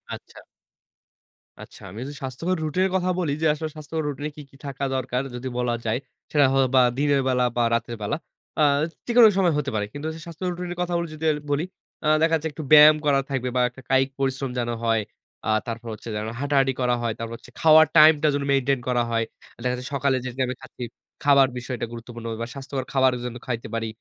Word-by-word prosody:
আচ্ছা। -, -, -14 dB, 1.2 s
আচ্ছা। -, -, -15 dB
আমি 105 Hz, +5 st, -9 dB
যদি 145 Hz, +1 st, -7 dB
স্বাস্থ্যকর 165 Hz, +8 st, -2 dB
রুটিনের 185 Hz, +5 st, +1 dB
কথা 185 Hz, 0 st, +1 dB
বলি 155 Hz, -5 st, 0 dB
যে -, -, +1 dB
আসলে 155 Hz, +1 st, -4 dB
স্বাস্থ্যকর 155 Hz, +1 st, -4 dB
রুটিনে 145 Hz, +1 st, -3 dB
কি, 150 Hz, -, -9 dB
কি -, -, -21 dB
থাকা 140 Hz, 0 st, -5 dB
দরকার 130 Hz, 0 st, -1 dB
যদি 125 Hz, +2 st, -5 dB
বলা 120 Hz, -1 st, 0 dB
যায়। 115 Hz, +3 st, 0 dB, 0.3 s
সেটা 145 Hz, -2 st, +5 dB
হয়তোবা 130 Hz, -1 st, +4 dB, 0.2 s
দিনের 145 Hz, -1 st, +2 dB
বেলা 125 Hz, -1 st, +2 dB
বা 120 Hz, -, +3 dB
রাতের 115 Hz, 0 st, -3 dB
বেলা। 105 Hz, +8 st, -1 dB, 0.4 s
আ -, -, +6 dB, 0.4 s
যে 240 Hz, -, -2 dB
কোনো 230 Hz, -2 st, +10 dB
সময় 175 Hz, -4 st, +3 dB
হতে 145 Hz, -1 st, -1 dB
পারে। 105 Hz, -1 st, 0 dB
কিন্তু 145 Hz, +2 st, -7 dB
যদি 160 Hz, -, -9 dB
স্বাস্থ্যকর 170 Hz, +2 st, -4 dB
রুটিন 175 Hz, 0 st, -5 dB
এর -, -, -14 dB
কথাগুলো 170 Hz, -1 st, -1 dB
যদি 155 Hz, +1 st, -9 dB
আর 150 Hz, -, -1 dB
বলি, 150 Hz, +4 st, +1 dB, 0.4 s
আ -, -, +2 dB
দেখা 165 Hz, 0 st, +3 dB
যাচ্ছে 160 Hz, 0 st, -2 dB
একটু 150 Hz, +2 st, -7 dB
ব্যায়াম 150 Hz, 0 st, +10 dB
করা 140 Hz, -1 st, +4 dB
থাকবে 130 Hz, -2 st, -1 dB
বা 125 Hz, -, +3 dB
একটা 130 Hz, +2 st, -14 dB
কায়িক 135 Hz, 0 st, +3 dB
পরিশ্রম 135 Hz, 0 st, -1 dB
যেনো 120 Hz, -1 st, -1 dB
হয়। 115 Hz, -1 st, +2 dB, 0.5 s
আ -, -, 0 dB, 0.2 s
তারপর 115 Hz, 0 st, -5 dB
হচ্ছে 115 Hz, -, -9 dB
যেনো 105 Hz, +1 st, -3 dB
হাঁটাহাঁটি 135 Hz, -2 st, +2 dB
করা 125 Hz, -1 st, +2 dB
হয়, 115 Hz, -2 st, -1 dB
তারপর 115 Hz, 0 st, -5 dB
হচ্ছে -, -, -17 dB
খাওয়ার 160 Hz, 0 st, +7 dB
টাইম 155 Hz, +1 st, +9 dB
টা -, -, +5 dB
যেনো 140 Hz, -1 st, -1 dB
মেইনটেইন 135 Hz, -1 st, +2 dB
করা 120 Hz, -1 st, +2 dB
হয়। 115 Hz, 0 st, +1 dB, 0.3 s
আ -, -, -33 dB
দেখা 125 Hz, 0 st, +1 dB
যাচ্ছে 125 Hz, 0 st, -7 dB
সকালে 135 Hz, -1 st, +2 dB
যে -, -, -2 dB
টাইমে 130 Hz, -1 st, 0 dB
খাচ্ছি, 125 Hz, -, -9 dB, 0.4 s
খাবার 140 Hz, -2 st, +6 dB
বিষয়টা 125 Hz, -1 st, -4 dB
গুরুত্বপূর্ণ 115 Hz, 0 st, -9 dB, 0.2 s
বা 115 Hz, -, -3 dB
স্বাস্থ্যকর 135 Hz, -1 st, -5 dB
খাবারও 130 Hz, -2 st, +3 dB
যেন 120 Hz, -1 st, -5 dB
খাইতে 120 Hz, -3 st, -3 dB
পারি। 115 Hz, 0 st, -2 dB
135 Hz, 215 wpm, -24 LUFS, 125-150 Hz, 1.2 s, কোনো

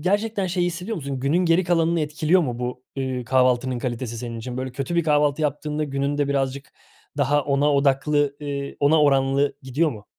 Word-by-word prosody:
gerçekten 205 Hz, +3 st, 0 dB
şeyi 175 Hz, 0 st, 0 dB
hissediyor 180 Hz, +6 st, -4 dB
musun? 140 Hz, -4 st, -4 dB
Günün 140 Hz, +6 st, +1 dB
geri 170 Hz, +2 st, +3 dB
kalanını 170 Hz, -1 st, +2 dB
etkiliyor 155 Hz, +4 st, +2 dB
mu 125 Hz, -6 st, -3 dB
bu, 125 Hz, +1 st, -4 dB, 0.2 s
ııı, 130 Hz, -2 st, -2 dB
kahvaltının 130 Hz, 0 st, +2 dB
kalitesi 120 Hz, -2 st, -4 dB
senin 115 Hz, -1 st, -5 dB
için? 125 Hz, +2 st, -6 dB
Böyle, 130 Hz, 0 st, -4 dB
kötü 135 Hz, +6 st, -4 dB
bir 170 Hz, -, +3 dB
kahvaltı 150 Hz, -1 st, +2 dB
yaptığında 150 Hz, +1 st, -1 dB
günün 140 Hz, +1 st, -2 dB
de 145 Hz, -1 st, +1 dB
birazcık 135 Hz, 0 st, -1 dB, 0.5 s
daha 145 Hz, +2 st, +2 dB
ona 145 Hz, +1 st, +2 dB
odaklı, 140 Hz, +1 st, +2 dB
eee, 140 Hz, -1 st, -5 dB
ona 150 Hz, +2 st, +4 dB
oranlı 135 Hz, 0 st, +2 dB
gidiyor 145 Hz, +5 st, 0 dB
mu? 105 Hz, -3 st, -9 dB
140 Hz, 185 wpm, -23 LUFS, 130-155 Hz, 0.5 s, ona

